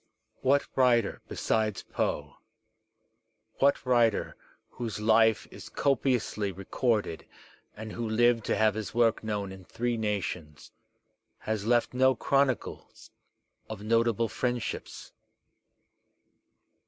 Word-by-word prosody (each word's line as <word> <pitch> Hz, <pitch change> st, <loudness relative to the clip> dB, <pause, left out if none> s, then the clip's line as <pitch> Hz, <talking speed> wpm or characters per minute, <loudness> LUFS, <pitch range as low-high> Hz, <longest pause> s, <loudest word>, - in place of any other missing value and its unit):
What 140 Hz, +2 st, +3 dB
writer 120 Hz, -4 st, +3 dB
besides 110 Hz, -3 st, -1 dB
Poe, -, -, -3 dB, 1.2 s
what 140 Hz, 0 st, +3 dB
writer 120 Hz, -4 st, +2 dB, 0.3 s
whose 115 Hz, -4 st, -5 dB
life 110 Hz, 0 st, +3 dB
is -, -, -10 dB
copi 135 Hz, -2 st, +1 dB
ously 105 Hz, -4 st, -3 dB
recorded 100 Hz, 0 st, -1 dB, 0.5 s
and 110 Hz, 0 st, -7 dB
who 115 Hz, 0 st, -4 dB
lived 120 Hz, +1 st, +3 dB
to -, -, +1 dB
have 110 Hz, -1 st, +3 dB
his 110 Hz, 0 st, -6 dB
work 115 Hz, -2 st, +2 dB
known 105 Hz, -3 st, -3 dB
in 95 Hz, -1 st, -11 dB
three 120 Hz, +5 st, -2 dB
nations, 95 Hz, -7 st, -4 dB, 0.7 s
has 110 Hz, -1 st, -3 dB
left 120 Hz, 0 st, +2 dB
no 130 Hz, +1 st, +4 dB
chronicles 135 Hz, 0 st, -1 dB, 0.6 s
of 105 Hz, -2 st, -7 dB
notable 115 Hz, 0 st, +2 dB
friendships? 125 Hz, 0 st, -4 dB
115 Hz, 105 wpm, -28 LUFS, 105-120 Hz, 1.2 s, no